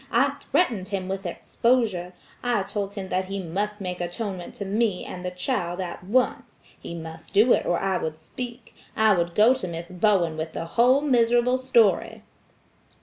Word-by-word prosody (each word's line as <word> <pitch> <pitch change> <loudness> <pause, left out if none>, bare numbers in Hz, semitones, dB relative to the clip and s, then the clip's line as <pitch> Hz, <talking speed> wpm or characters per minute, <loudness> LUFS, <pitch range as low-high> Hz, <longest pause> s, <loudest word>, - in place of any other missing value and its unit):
I - - +3 0.2
threatened 225 - +2
him 195 -2 -3
with 190 0 -3
exposure. 210 -2 0 0.3
I 240 -5 +1
told 200 0 -4
him 190 -2 -5
that 185 +1 0
he 195 +1 -4
must 200 +4 -3
make 180 -2 -4
atonement 180 0 -4
to 200 - -5
me 205 -1 0
and 180 - -7
the 180 - -2
child 180 -1 -2
at 180 -1 -5
once. 250 +7 0 0.2
He 170 - -7
must 160 -1 -9
do 225 +5 +6
it - - 0
or 175 - +2
I 190 -1 0
would 155 -1 -4
speak; 245 +4 -8 0.2
I 220 -1 +5
would 170 -2 -1
go 220 +4 +6
to 255 -8 -4
Miss 170 +1 -6
Bowen 180 -4 +2
with 160 0 -4
the 165 - -4
whole 245 +9 +4
miserable 245 -2 +3
story." 230 -8 +2
195 Hz, 180 wpm, -25 LUFS, 180-235 Hz, 0.3 s, do